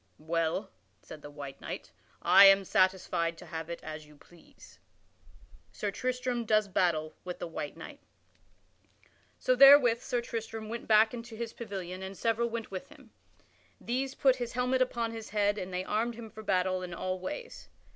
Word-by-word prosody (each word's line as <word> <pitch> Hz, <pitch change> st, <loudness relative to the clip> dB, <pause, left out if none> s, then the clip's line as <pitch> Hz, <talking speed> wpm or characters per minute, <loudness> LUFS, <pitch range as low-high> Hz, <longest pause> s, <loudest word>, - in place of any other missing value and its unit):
"Well," 165 Hz, +5 st, -2 dB, 0.3 s
said 155 Hz, -, -11 dB
the 145 Hz, -, -9 dB
white 140 Hz, -2 st, -9 dB
knight, -, -, -7 dB, 0.3 s
"I 200 Hz, -, +8 dB
am 195 Hz, 0 st, +7 dB
satisfied 180 Hz, -3 st, +1 dB
to -, -, -11 dB
have 160 Hz, 0 st, -6 dB
it 170 Hz, -, -5 dB
as 155 Hz, -1 st, -8 dB
you 150 Hz, -, -17 dB
please." 170 Hz, +3 st, -19 dB, 0.9 s
[Sidenote: -, -, -27 dB
Sir 205 Hz, -, -2 dB
Tristram 250 Hz, +1 st, -2 dB
does 215 Hz, -1 st, +2 dB
battle 160 Hz, -4 st, 0 dB
with 180 Hz, -1 st, -6 dB
the -, -, -5 dB
white 160 Hz, -3 st, -6 dB
knight] -, -, -10 dB, 1.4 s
So 255 Hz, -, +2 dB
therewith 260 Hz, -3 st, +8 dB
Sir 245 Hz, -2 st, -1 dB
Tristram 225 Hz, -2 st, -5 dB
went 235 Hz, +1 st, -6 dB
back 220 Hz, +1 st, +5 dB
into 230 Hz, -1 st, -8 dB
his 230 Hz, 0 st, -5 dB
pavilion 190 Hz, -5 st, -6 dB
and 190 Hz, 0 st, -7 dB
several 230 Hz, +1 st, 0 dB
went 230 Hz, -2 st, -5 dB
with 185 Hz, -1 st, -6 dB
him. -, -, -18 dB, 0.7 s
These 265 Hz, +3 st, -2 dB
put 265 Hz, -2 st, +3 dB
his 240 Hz, -1 st, -4 dB
helmet 250 Hz, +1 st, +1 dB
upon 235 Hz, -2 st, 0 dB
his 225 Hz, -1 st, -8 dB
head 205 Hz, 0 st, +1 dB
and 185 Hz, 0 st, -6 dB
they 180 Hz, 0 st, -2 dB
armed 225 Hz, +4 st, -1 dB
him 225 Hz, -2 st, -9 dB
for 220 Hz, -, -10 dB
battle 185 Hz, -2 st, 0 dB
in 180 Hz, -1 st, -6 dB
all 185 Hz, +1 st, -3 dB
ways. 475 Hz, -, -7 dB
210 Hz, 175 wpm, -30 LUFS, 180-235 Hz, 1.4 s, I